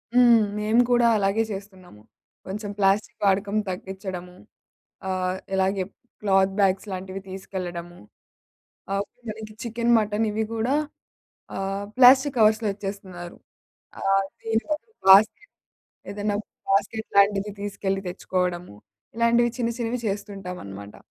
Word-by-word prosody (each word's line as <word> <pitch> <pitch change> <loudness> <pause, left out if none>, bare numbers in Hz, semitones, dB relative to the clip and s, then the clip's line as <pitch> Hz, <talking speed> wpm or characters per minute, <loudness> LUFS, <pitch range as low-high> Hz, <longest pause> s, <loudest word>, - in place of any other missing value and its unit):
హ్మ్. 240 -2 +7 0.2
మేము 220 +3 +3
కూడా 240 -1 +4
అలాగే 200 +2 +2
చేస్తున్నాము. 190 - -9 0.5
కొంచెం 205 +2 -5
ప్లాస్టిక్ 205 +3 +1
వాడకం 200 +1 +2
తగ్గించడము, 185 -1 -6 0.7
ఆహ్, 185 0 -1 0.2
ఇలాగే 190 0 +1 0.4
క్లాత్ 195 -1 +3
బ్యాగ్స్ 195 +1 +2
లాంటివి 190 +1 -5
తీసుకెళ్లడము. 175 -2 -6 1.0
అవును 205 +5 -5
మనకి 215 0 -7
చికెన్, 235 0 +1
మటన్ 215 +1 0
ఇవి 220 +1 -1
కూడా 235 +5 +1 0.8
ఆహ్, 195 +1 -3
ప్లాస్టిక్ 260 +2 +7
కవర్స్‌లో 215 0 +4
ఇచ్చేస్తున్నారు. 195 -3 -7 0.6
ఆహ్, 195 0 +2 0.2
దీని 225 0 0
వరకు 305 +9 -3 0.2
బాస్కెట్ 215 - +6 0.6
ఏదన్నా 205 0 -1 0.4
బాస్కెట్ 210 +3 0
లాంటిది 200 0 +4
తీసుకెళ్ళి 195 -1 -2
తెచ్చుకోవడము, 180 - -2 0.4
ఇలాంటివి 235 0 +3
చిన్న 235 - +1
చిన్నవి 235 +1 -2
చేస్తుంటామనమాట. 180 - -6
200 Hz, 110 wpm, -25 LUFS, 190-220 Hz, 1.0 s, హ్మ్